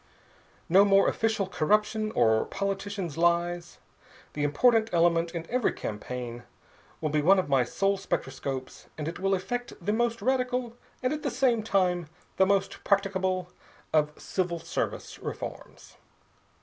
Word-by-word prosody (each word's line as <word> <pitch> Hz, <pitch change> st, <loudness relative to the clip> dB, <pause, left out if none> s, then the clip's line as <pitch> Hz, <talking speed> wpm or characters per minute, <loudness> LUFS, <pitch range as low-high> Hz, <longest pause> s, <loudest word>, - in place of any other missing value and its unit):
"No 190 Hz, +4 st, +6 dB
more 195 Hz, -1 st, +5 dB
official 220 Hz, -3 st, +1 dB
corruption 210 Hz, +5 st, +1 dB
or 110 Hz, 0 st, +3 dB
politicians' 195 Hz, -4 st, -3 dB
lies. 175 Hz, 0 st, +1 dB, 0.6 s
The 145 Hz, -, -2 dB
important 225 Hz, -, +3 dB
element 170 Hz, 0 st, +3 dB
in 165 Hz, -1 st, -5 dB
every 250 Hz, -1 st, +1 dB
campaign 120 Hz, +2 st, -5 dB, 0.6 s
will 155 Hz, -2 st, -2 dB
be 150 Hz, 0 st, +2 dB
one 190 Hz, +6 st, +5 dB
of 185 Hz, -, +1 dB
my 135 Hz, -2 st, +4 dB
soul 195 Hz, +10 st, 0 dB
spectroscopes, 135 Hz, -6 st, -4 dB
and 150 Hz, -1 st, -4 dB
it 165 Hz, -, -5 dB
will 195 Hz, 0 st, +2 dB
effect 245 Hz, +6 st, -4 dB
the 205 Hz, +4 st, -1 dB
most 235 Hz, 0 st, 0 dB
radical, 250 Hz, 0 st, 0 dB, 0.3 s
and, 255 Hz, -, +1 dB
at 305 Hz, -, -4 dB
the 280 Hz, -, -1 dB
same 240 Hz, -2 st, +2 dB
time, 180 Hz, -5 st, +1 dB, 0.3 s
the 190 Hz, -, +5 dB
most 195 Hz, 0 st, 0 dB
practicable 190 Hz, -2 st, 0 dB, 0.4 s
of 150 Hz, -1 st, +1 dB
civil 180 Hz, -2 st, -2 dB
service -, -, -4 dB
reforms. -, -, -8 dB
190 Hz, 140 wpm, -28 LUFS, 165-215 Hz, 0.6 s, No